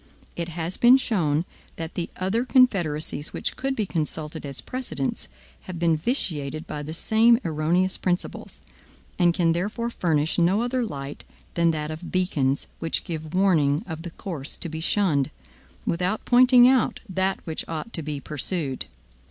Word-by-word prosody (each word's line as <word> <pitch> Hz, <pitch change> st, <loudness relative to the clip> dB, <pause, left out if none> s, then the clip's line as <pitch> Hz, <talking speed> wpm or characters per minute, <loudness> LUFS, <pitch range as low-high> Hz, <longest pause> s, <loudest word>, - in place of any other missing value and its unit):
It 170 Hz, 0 st, -3 dB
has 170 Hz, +2 st, -3 dB
been 245 Hz, +2 st, +7 dB
shown, 170 Hz, -, 0 dB, 0.3 s
that 165 Hz, 0 st, -6 dB
the 170 Hz, -, -3 dB
other 195 Hz, +6 st, 0 dB
confederacies 175 Hz, -, +2 dB
which -, -, -3 dB
could 270 Hz, +1 st, -2 dB
be 215 Hz, -, 0 dB
consulted 155 Hz, -3 st, -3 dB
as 140 Hz, -1 st, -7 dB
precedents 250 Hz, -, -3 dB, 0.4 s
have 185 Hz, -2 st, -6 dB
been 165 Hz, -1 st, +3 dB
vitiated 155 Hz, -, -1 dB
by 150 Hz, -, -5 dB
the 150 Hz, +1 st, -6 dB
same 225 Hz, +5 st, +4 dB
erroneous 170 Hz, +4 st, +1 dB
principles, 180 Hz, -1 st, -3 dB, 0.6 s
and 175 Hz, -1 st, +5 dB
can 170 Hz, -1 st, +2 dB
therefore 210 Hz, +7 st, -2 dB
furnish 160 Hz, -5 st, 0 dB
no 190 Hz, +6 st, +3 dB
other 245 Hz, +1 st, 0 dB
light 140 Hz, -9 st, -6 dB, 0.3 s
than 170 Hz, -1 st, +3 dB
that 155 Hz, -1 st, -2 dB
of 160 Hz, +3 st, -7 dB
beacons, 145 Hz, -7 st, +1 dB
which 165 Hz, -, -1 dB
give 160 Hz, -1 st, -5 dB
warning 160 Hz, -7 st, +3 dB
of 160 Hz, -3 st, -6 dB
the 175 Hz, -, -6 dB
course 165 Hz, -6 st, -4 dB
to 170 Hz, -, -5 dB
be 160 Hz, 0 st, -5 dB
shunned, 160 Hz, -6 st, +2 dB, 0.6 s
without 180 Hz, +5 st, -1 dB
pointing 250 Hz, 0 st, +7 dB
out 260 Hz, -2 st, +3 dB
that 190 Hz, 0 st, 0 dB
which 160 Hz, -1 st, -3 dB
ought 165 Hz, +8 st, -5 dB
to 165 Hz, -, -2 dB
be 150 Hz, -1 st, -4 dB
pursued. 145 Hz, -1 st, -2 dB
170 Hz, 160 wpm, -25 LUFS, 155-200 Hz, 0.6 s, been